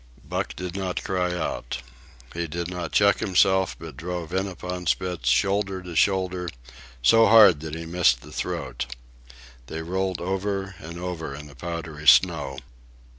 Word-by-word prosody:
Buck -, -, -3 dB
did 90 Hz, 0 st, -6 dB
not 95 Hz, -2 st, -3 dB
cry 90 Hz, -1 st, 0 dB
out. 80 Hz, -, -3 dB, 0.6 s
He 85 Hz, 0 st, -3 dB
did 85 Hz, +3 st, -4 dB
not 90 Hz, -2 st, -4 dB
check 100 Hz, 0 st, +4 dB
himself, 95 Hz, -2 st, +3 dB
but 80 Hz, -4 st, -9 dB
drove 85 Hz, +1 st, -5 dB
in 95 Hz, +1 st, 0 dB
upon 90 Hz, -1 st, -6 dB
Spitz, 90 Hz, -9 st, 0 dB
shoulder 95 Hz, +4 st, +1 dB
to 90 Hz, -2 st, -8 dB
shoulder, 90 Hz, -1 st, +1 dB, 0.5 s
so 115 Hz, -, +6 dB
hard 105 Hz, -9 st, +8 dB
that 80 Hz, 0 st, -6 dB
he 80 Hz, 0 st, -6 dB
missed 80 Hz, -7 st, +3 dB
the -, -, -13 dB
throat. 60 Hz, -, -4 dB, 0.7 s
They 80 Hz, +3 st, -5 dB
rolled 95 Hz, +1 st, -2 dB
over 95 Hz, +1 st, -2 dB
and 85 Hz, +2 st, -8 dB
over 85 Hz, -5 st, -5 dB
in 75 Hz, +1 st, -9 dB
the 70 Hz, -1 st, -14 dB
powdery 80 Hz, 0 st, -6 dB
snow. 75 Hz, -7 st, +5 dB
90 Hz, 155 wpm, -25 LUFS, 80-95 Hz, 0.7 s, hard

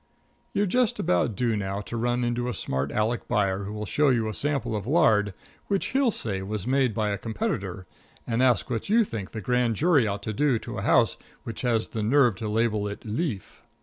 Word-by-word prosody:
You're 205 Hz, -, +1 dB
just 240 Hz, +4 st, +1 dB
about 90 Hz, +5 st, +1 dB
due 115 Hz, +2 st, +1 dB
now 100 Hz, -1 st, -2 dB
to 110 Hz, -, -7 dB
run 120 Hz, +1 st, 0 dB
into 120 Hz, +1 st, -1 dB
a 120 Hz, -, -3 dB
smart 65 Hz, +1 st, -2 dB
Aleck 110 Hz, +2 st, -1 dB
buyer 100 Hz, -1 st, 0 dB
who'll 105 Hz, +1 st, -5 dB
show 150 Hz, +7 st, +2 dB
you 115 Hz, -4 st, +2 dB
a 110 Hz, -, -3 dB
sample 140 Hz, -3 st, -1 dB
of 105 Hz, 0 st, -4 dB
lard 120 Hz, -10 st, +3 dB, 0.4 s
which 195 Hz, -2 st, 0 dB
he'll 270 Hz, -1 st, +3 dB
say 100 Hz, -, -1 dB
was 100 Hz, +1 st, -4 dB
made 130 Hz, -3 st, +2 dB
by 110 Hz, -2 st, 0 dB
a 100 Hz, -, -2 dB
competitor, 95 Hz, -4 st, -3 dB, 0.4 s
and 115 Hz, +1 st, 0 dB
ask 130 Hz, -2 st, +3 dB
what 115 Hz, -, -3 dB
you 230 Hz, +2 st, +5 dB
think 110 Hz, -, -5 dB
the 110 Hz, -, -6 dB
grand 125 Hz, +1 st, +1 dB
jury 145 Hz, -, +3 dB
ought 100 Hz, 0 st, -3 dB
to 110 Hz, -, -3 dB
do 135 Hz, +2 st, +2 dB
to -, -, -6 dB
a -, -, -3 dB
house -, -, +3 dB, 0.3 s
which 115 Hz, -, -5 dB
had 120 Hz, -3 st, +2 dB
the 110 Hz, -, -5 dB
nerve 120 Hz, +2 st, +4 dB
to 110 Hz, -2 st, -4 dB
label 110 Hz, -1 st, +1 dB
it 100 Hz, +3 st, -7 dB
"leaf." 110 Hz, -, -3 dB
115 Hz, 215 wpm, -26 LUFS, 105-130 Hz, 0.4 s, you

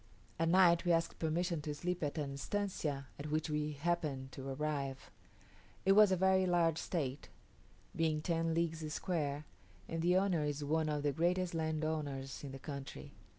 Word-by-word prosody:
At 165 Hz, 0 st, +2 dB
night 175 Hz, -1 st, +6 dB
we 175 Hz, -1 st, +3 dB
asked 165 Hz, 0 st, 0 dB
permission 165 Hz, 0 st, 0 dB
to 150 Hz, 0 st, -4 dB
sleep 180 Hz, +4 st, -2 dB
at 145 Hz, -1 st, -2 dB
an 145 Hz, -2 st, -2 dB
estancia 150 Hz, -3 st, -2 dB
at 150 Hz, +1 st, -5 dB
which 155 Hz, +1 st, 0 dB
we 150 Hz, 0 st, -1 dB
happened 145 Hz, -4 st, -1 dB
to 135 Hz, +1 st, -6 dB
arrive. 140 Hz, -1 st, -3 dB, 0.7 s
It 195 Hz, -, +5 dB
was 210 Hz, 0 st, +7 dB
a -, -, +5 dB
very 190 Hz, 0 st, +3 dB
large 170 Hz, -2 st, +3 dB
estate, 140 Hz, -, -3 dB, 0.7 s
being 160 Hz, -2 st, +1 dB
ten 165 Hz, -1 st, 0 dB
leagues 165 Hz, -2 st, -1 dB
square, 150 Hz, -4 st, -2 dB, 0.4 s
and 165 Hz, 0 st, -2 dB
the 180 Hz, +2 st, +4 dB
owner 185 Hz, -5 st, +2 dB
is 145 Hz, 0 st, -2 dB
one 155 Hz, +2 st, +1 dB
of 150 Hz, -1 st, -1 dB
the 145 Hz, -, +2 dB
greatest 175 Hz, +3 st, +1 dB
landowners 155 Hz, -4 st, -2 dB
in 140 Hz, -, -5 dB
the 135 Hz, -, -6 dB
country. 140 Hz, 0 st, -7 dB
155 Hz, 170 wpm, -35 LUFS, 145-170 Hz, 0.7 s, was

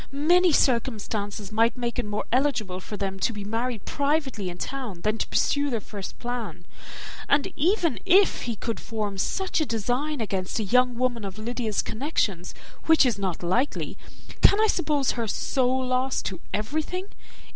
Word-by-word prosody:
Many 345 Hz, +6 st, +4 dB
circumstances 215 Hz, -6 st, 0 dB
might 230 Hz, +3 st, +2 dB
make 240 Hz, 0 st, -2 dB
it 235 Hz, -, -2 dB
more 210 Hz, 0 st, -2 dB
eligible 240 Hz, -8 st, +1 dB
for 210 Hz, +2 st, -7 dB
them 195 Hz, -1 st, -3 dB
to 190 Hz, -, +1 dB
be 210 Hz, -2 st, -6 dB
married 225 Hz, +2 st, -2 dB
privately 280 Hz, -, 0 dB
in 175 Hz, -, -7 dB
town 240 Hz, -7 st, -5 dB
than 215 Hz, +3 st, 0 dB
to -, -, -1 dB
pursue 285 Hz, 0 st, +1 dB
their 235 Hz, -4 st, -1 dB
first 200 Hz, -1 st, -8 dB
plan; 245 Hz, -1 st, -5 dB, 0.6 s
and 285 Hz, 0 st, +2 dB
even 335 Hz, -, +2 dB
if 390 Hz, +2 st, +4 dB
he 235 Hz, -2 st, -3 dB
could 230 Hz, +2 st, -3 dB
form 210 Hz, -4 st, -4 dB
such 375 Hz, -, 0 dB
a -, -, +2 dB
design 245 Hz, +7 st, -1 dB
against 190 Hz, -4 st, -2 dB
a 220 Hz, -, 0 dB
young 250 Hz, +4 st, +3 dB
woman 240 Hz, -2 st, 0 dB
of 195 Hz, 0 st, -6 dB
Lydia's 225 Hz, -1 st, -2 dB
connections, 215 Hz, -, -2 dB, 0.3 s
which 320 Hz, -3 st, +6 dB
is 230 Hz, -5 st, +1 dB
not 185 Hz, -3 st, -2 dB
likely, 235 Hz, +11 st, 0 dB, 0.5 s
can 405 Hz, -, +6 dB
I 440 Hz, -, +5 dB
suppose 300 Hz, -, +1 dB
her 230 Hz, -2 st, -2 dB
so 250 Hz, +4 st, +1 dB
lost 255 Hz, 0 st, 0 dB
to 185 Hz, -3 st, -3 dB
everything? 310 Hz, -, -2 dB
240 Hz, 165 wpm, -26 LUFS, 210-280 Hz, 0.6 s, which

